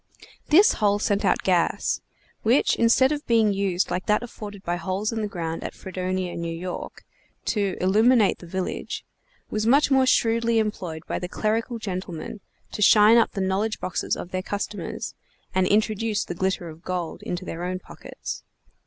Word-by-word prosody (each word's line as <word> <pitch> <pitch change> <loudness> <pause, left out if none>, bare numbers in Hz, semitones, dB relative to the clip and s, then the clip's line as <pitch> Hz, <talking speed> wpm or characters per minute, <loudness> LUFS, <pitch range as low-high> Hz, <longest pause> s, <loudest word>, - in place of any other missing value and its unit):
This 395 +10 +6
hole 205 -1 +4
sent 205 0 0
out - - +2
gas; 180 -3 +1 0.4
which, 235 +5 +3
instead 240 +4 +4
of 295 -1 -3
being 225 -3 +4
used 195 -2 0
like 180 +1 -2
that 210 +3 +2
afforded 205 -4 -8
by 175 +1 -1
holes 190 +5 -2
in 225 -1 -2
the 210 - -1
ground 165 -4 -4
at - - -6
Fredonia, 185 -1 -3
N. 170 - -5
Y., 170 +2 -4 0.6
to 200 -4 0
illuminate 215 +4 +4
the 175 - -11
village, 185 +1 -4 0.5
was 215 +1 -1
much 280 +4 +4
more 265 -1 +4
shrewdly 230 -1 +3
employed 185 -7 -2
by - - -3
the 180 - -5
clerical 225 +4 -1
gentlemen 185 -2 -5 0.3
to - - -5
shine 210 +2 +7
up 230 - +3
the 195 - -2
knowledge 195 +3 0
boxes 185 - -2
of 175 - -7
their 185 - -1
customers, 205 -1 -4 0.4
and 185 0 +2
introduce 215 +1 +1
the - - -4
glitter 185 0 -1
of 160 0 -10
gold 180 -2 -4
into 180 +1 -4
their 170 0 -5
own 180 +1 -2
pockets. - - -8
200 Hz, 170 wpm, -25 LUFS, 185-225 Hz, 0.6 s, shine